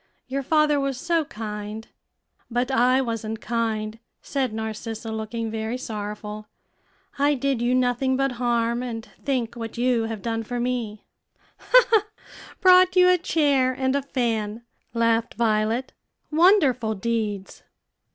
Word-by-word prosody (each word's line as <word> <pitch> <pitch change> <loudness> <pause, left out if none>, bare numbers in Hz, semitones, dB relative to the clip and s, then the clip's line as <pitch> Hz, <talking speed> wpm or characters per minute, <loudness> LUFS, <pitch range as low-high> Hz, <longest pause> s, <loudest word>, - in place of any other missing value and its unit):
your 270 +1 -2
father 300 +1 +3
was 275 -2 -2
so 335 +1 +1
kind." 210 -1 -6 0.6
"But 245 +2 -1
I 255 +1 +4
wasn't 225 -3 -3
kind," 220 -1 -2 0.2
said 265 -4 -1
Narcissa, 220 +1 -5
looking 220 +1 -4
very 220 +2 -3
sorrowful; 210 -2 -6 0.7
"I 290 +1 +3
did 270 -2 -1
you 245 +1 +2
nothing 255 +1 +1
but 275 0 +1
harm; 235 0 +1
and 235 -2 -5 0.2
think 255 -5 -1
what 230 -1 -6
you 240 -2 +2
have 225 -3 -5
done 225 -1 -1
for 245 +2 -4
me." 240 -4 -3 1.6
"Brought 370 0 +6
you 365 0 +6
a 365 - +5
chair 285 -6 +2
and 260 +1 0
a 280 - +1
fan," 230 -5 -2 0.3
laughed 230 0 +1
Violet; 225 +2 0 0.4
"wonderful 295 - +4
deeds!" 210 -2 -3
235 Hz, 130 wpm, -24 LUFS, 220-265 Hz, 1.6 s, Brought